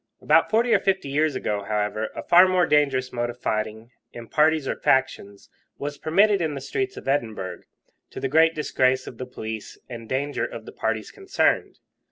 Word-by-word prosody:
About 160 +2 +3
forty 230 +2 +2
or - - +5
fifty 190 -7 -1
years 150 +1 +1
ago, 105 -5 -2
however, 105 +1 -2
a - - -5
far 180 +2 +6
more 185 -1 +3
dangerous 140 -4 +1
mode 120 0 -2
of 120 +1 -9
fighting, 110 +1 -3 0.2
in 120 -1 -9
parties 155 -2 +2
or - - -1
factions, 100 -7 -1 0.3
was 145 0 -5
permitted 200 +4 +3
in 155 -3 -1
the - - -4
streets 390 - -3
of - - -9
Edinburgh, 110 -10 -2 0.5
to - - -8
the 135 - -1
great 160 +4 +4
disgrace 130 -4 +1
of 115 - -10
the 130 - -5
police 110 -3 -7
and 115 -3 -9
danger 140 +2 -2
of - - -6
the - - -9
parties - - -3
concerned. 390 -1 0
135 Hz, 190 wpm, -24 LUFS, 115-160 Hz, 0.5 s, far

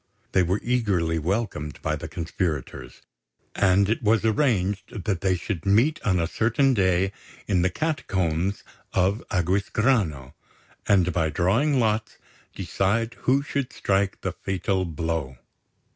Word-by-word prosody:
They 95 - +3
were 90 +3 +1
eagerly 100 -10 +1
welcomed 85 -4 -2
by - - 0
the - - -6
conspirators; 80 -4 -4 0.5
and 100 0 +3
it 115 +4 0
was 110 0 +2
arranged 105 -4 0
that 95 -5 -1
they 95 -1 +2
should 85 -1 -4
meet 120 +11 +3
on 95 -3 +1
a 85 - +1
certain 120 +9 +2
day 95 -2 +2 0.3
in 95 -4 +1
the 90 - +2
Catacombs 95 - -1 0.3
of 95 +4 +1
Aquisgrano, 95 - 0 0.5
and, 90 -3 +3
by 80 -2 +1
drawing 115 - +2
lots, 110 -1 0 0.4
decide 115 +4 0 0.2
who 135 +2 +3
should 140 -2 -3
strike 95 0 0
the - - -2
fatal 95 0 -2
blow. 80 -5 -3
95 Hz, 130 wpm, -25 LUFS, 85-110 Hz, 0.5 s, They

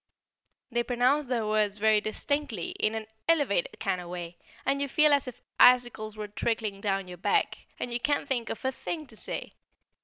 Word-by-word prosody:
They 240 0 +1
pronounce 250 +4 +2
their 240 -3 0
words 210 -1 +1
very 215 0 +4
distinctly, 225 - -2
in 215 +1 +1
an 220 -1 -4 0.2
elevated 330 - +2
kind 180 - -1
of 175 - -9
way, 175 -1 -6 0.3
and 280 0 +1
you 280 - 0
feel 300 +1 +5
as 280 -1 +2
if 245 -1 -9 0.2
icicles 240 -4 +5
were 210 -1 -4
trickling 210 -1 -2
down 195 -2 -1
your 180 -1 -9
back, 425 - 0
and 245 - -3
you 240 - 0
can't 285 +2 0
think 245 -5 -1
of 225 - -5
a 260 - +2
thing 310 +4 -5
to 240 - -16
say. - - -4
235 Hz, 190 wpm, -28 LUFS, 210-275 Hz, 0.3 s, feel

